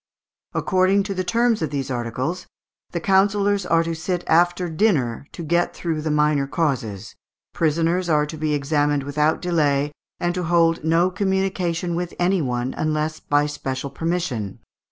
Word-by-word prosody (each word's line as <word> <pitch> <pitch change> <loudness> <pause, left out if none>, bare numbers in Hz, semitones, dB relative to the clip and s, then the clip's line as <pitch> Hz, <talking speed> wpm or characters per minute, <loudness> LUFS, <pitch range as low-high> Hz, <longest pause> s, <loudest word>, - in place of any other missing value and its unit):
According 190 +2 +2
to 200 0 -3
the 185 -1 -2
terms 230 +2 +1
of 160 - -1
these 135 -2 -3
articles, 125 +9 -3 0.4
"the 170 - -3
councillors 200 +1 +2
are 165 -1 +3
to 165 0 -3
sit 175 +2 -2
after 175 +2 +3
dinner, 155 - 0
to 170 - -6
get 170 +2 +1
through 160 -3 -2
the 155 - -2
minor 150 -2 +2
causes. 115 - -2 0.4
Prisoners 165 +3 +1
are 150 -2 +3
to 150 - -7
be 155 -1 -1
examined 145 0 +1
without 150 +4 0
delay, 150 -5 +1 0.3
and 175 0 0
to 180 -1 -2
hold 165 -1 +3
no 165 +3 +3
communication 190 -3 -1
with 175 +1 -3
any 180 +1 +2
one, 125 -2 -2
unless 155 0 -1
by 145 0 +1
special 140 -2 -4
permission. 155 - -2
165 Hz, 155 wpm, -22 LUFS, 145-180 Hz, 0.4 s, are